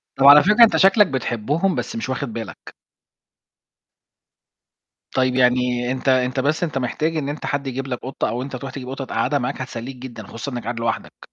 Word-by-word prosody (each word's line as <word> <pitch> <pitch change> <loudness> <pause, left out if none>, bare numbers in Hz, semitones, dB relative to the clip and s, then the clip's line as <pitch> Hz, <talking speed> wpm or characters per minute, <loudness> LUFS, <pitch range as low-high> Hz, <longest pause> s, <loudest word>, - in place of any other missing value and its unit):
طَب 135 - +2
على 145 +1 +10
فكرة 210 +4 +6
أنت 225 - +5
شكلك 195 +1 +5
بتحبهم، 135 - -1
بس 235 - -4
مش 225 - -4
واخد 125 -3 -3
بالك. 115 -3 -8 2.4
طيب 130 -1 +2
يعني 125 -1 +2
أنت 130 +1 -1
أنت 130 0 +2
بس 150 +6 0
أنت 155 -5 -2
محتاج 155 +6 -1
إن 140 -2 -2
أنت 145 - -5
حد 140 -1 -2
يجيب 135 +1 -4
لك 125 -2 -4
قطة 130 +1 -2
أو 120 +2 -3
أنت 135 0 -6
تروح 130 +1 -6
تجيب 130 -1 -8
قطة 135 0 -5
تقعدها 145 +2 0
معاك 130 +2 -3
هتسليك 125 +1 -6
جدًا، 120 -4 -9
خصوصًا 120 +5 -6
إنك 120 -1 -5
قاعد 115 0 -4
لوحدك. 115 - -4
130 Hz, 190 wpm, -21 LUFS, 125-145 Hz, 2.4 s, على